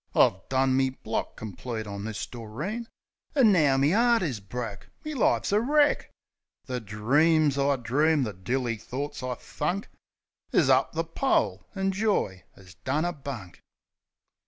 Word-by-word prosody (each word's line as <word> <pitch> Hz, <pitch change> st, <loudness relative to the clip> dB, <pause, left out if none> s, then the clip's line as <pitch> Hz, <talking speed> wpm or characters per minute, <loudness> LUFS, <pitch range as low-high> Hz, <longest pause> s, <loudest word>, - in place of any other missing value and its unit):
I -, -, +5 dB
done 130 Hz, 0 st, +2 dB
me 130 Hz, 0 st, +3 dB
block 115 Hz, -4 st, -4 dB
complete 110 Hz, +2 st, -5 dB
on 100 Hz, 0 st, -6 dB
this 110 Hz, -2 st, -4 dB
Doreen, 150 Hz, -, -5 dB, 0.5 s
An' 250 Hz, -7 st, +6 dB
now 150 Hz, -8 st, +4 dB
me 140 Hz, +5 st, +3 dB
'eart 235 Hz, 0 st, +4 dB
is 135 Hz, -10 st, -2 dB
broke, 105 Hz, 0 st, -6 dB, 0.2 s
me 305 Hz, -, -3 dB
life's 260 Hz, -, +2 dB
wreck! 290 Hz, +8 st, +3 dB, 0.6 s
The 125 Hz, -1 st, -3 dB
dreams 140 Hz, +8 st, +2 dB
I 140 Hz, 0 st, +2 dB
dreamed, 140 Hz, +4 st, +2 dB
the 105 Hz, -, -4 dB
dilly 115 Hz, +5 st, -2 dB
thorts 135 Hz, +7 st, -5 dB
I 125 Hz, -1 st, -3 dB
thunk 175 Hz, -, -3 dB, 0.6 s
Is -, -, +4 dB
up -, -, +3 dB
the -, -, 0 dB
pole, -, -, 0 dB
an' 195 Hz, 0 st, 0 dB
joy 190 Hz, -, 0 dB
'as 95 Hz, -2 st, -15 dB
done 150 Hz, +5 st, 0 dB
a 175 Hz, -, -1 dB
bunk. 130 Hz, -, -8 dB
135 Hz, 150 wpm, -27 LUFS, 115-175 Hz, 0.6 s, An